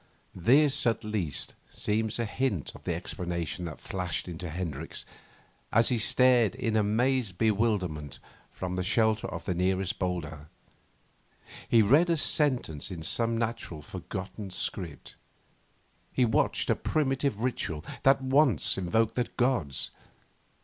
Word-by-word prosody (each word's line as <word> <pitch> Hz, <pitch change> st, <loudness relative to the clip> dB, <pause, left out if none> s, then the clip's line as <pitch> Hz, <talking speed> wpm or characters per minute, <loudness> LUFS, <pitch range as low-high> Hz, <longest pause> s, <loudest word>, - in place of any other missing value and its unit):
This, 130 Hz, -, +4 dB
at 115 Hz, 0 st, +1 dB
least, 105 Hz, -9 st, -3 dB, 0.2 s
seems 110 Hz, +1 st, 0 dB
a 120 Hz, -, -1 dB
hint 110 Hz, -, -1 dB
of -, -, -14 dB
the -, -, 0 dB
explanation 85 Hz, -1 st, -4 dB
that 75 Hz, -4 st, -7 dB
flashed 90 Hz, -3 st, -3 dB
into 90 Hz, 0 st, -6 dB
Hendricks 80 Hz, -2 st, -4 dB, 0.7 s
as 115 Hz, +1 st, +5 dB
he 120 Hz, -, +1 dB
stared 120 Hz, -1 st, +4 dB
in 115 Hz, -4 st, -1 dB
amazed 110 Hz, -1 st, +1 dB
bewilderment 100 Hz, -, 0 dB, 0.3 s
from 90 Hz, -1 st, -4 dB
the 90 Hz, -, 0 dB
shelter 110 Hz, +2 st, +2 dB
of -, -, -6 dB
the 90 Hz, -, 0 dB
nearest 95 Hz, +1 st, 0 dB
boulder. 80 Hz, -5 st, -3 dB, 1.2 s
He 115 Hz, -2 st, +6 dB
read 145 Hz, -, +5 dB
a 170 Hz, -, +3 dB
sentence 130 Hz, -, +1 dB
in 85 Hz, -4 st, -6 dB
some 115 Hz, +7 st, +1 dB
natural, 115 Hz, -9 st, -3 dB
forgotten 95 Hz, +5 st, -6 dB
script. 90 Hz, -3 st, -5 dB, 0.9 s
He 125 Hz, -, +3 dB
watched 110 Hz, -, +1 dB
a -, -, +3 dB
primitive 135 Hz, -6 st, 0 dB
ritual 110 Hz, -11 st, -2 dB, 0.2 s
that 135 Hz, 0 st, +4 dB
once 130 Hz, -, +3 dB
invoked 110 Hz, +5 st, +1 dB
the 125 Hz, -, 0 dB
gods. 120 Hz, -, 0 dB
105 Hz, 130 wpm, -29 LUFS, 90-120 Hz, 1.2 s, He